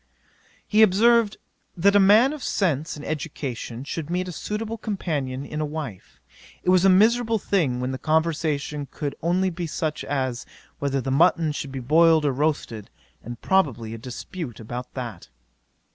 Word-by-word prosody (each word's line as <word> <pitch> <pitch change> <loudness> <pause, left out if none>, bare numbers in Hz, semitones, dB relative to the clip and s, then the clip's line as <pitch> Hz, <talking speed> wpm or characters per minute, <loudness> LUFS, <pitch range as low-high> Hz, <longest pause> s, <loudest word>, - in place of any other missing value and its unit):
'He 215 +1 +3
observed, 220 +2 +4 0.4
that 200 +4 +4
a - - +7
man 215 +8 +6
of 305 - -8
sense 160 - -1
and 150 - -9
education 135 -5 -5
should 155 +2 -5
meet 180 +1 -1
a - - -4
suitable 215 +5 -4
companion 145 -10 -3
in 150 +2 -4
a - - 0
wife. 145 - -7 0.4
It - - 0
was 185 -1 +4
a 195 - +6
miserable 225 +4 +4
thing 160 -12 0
when 125 +1 -2
the 130 - -5
conversation 155 -2 -1
could 145 -2 -4
only 185 +3 +1
be 170 0 -4
such 155 0 -3
as, 130 -3 -2 0.4
whether 140 -1 -1
the 135 - -3
mutton 160 +2 +3
should 145 -2 -5
be 135 - -5
boiled 160 +4 +4
or 145 - +3
roasted, 135 -6 -2 0.3
and 120 +1 -8
probably 125 - +1
a 115 - -7
dispute 125 - -7
about 120 +3 -7
that. 120 -9 -6
155 Hz, 165 wpm, -24 LUFS, 130-185 Hz, 0.4 s, a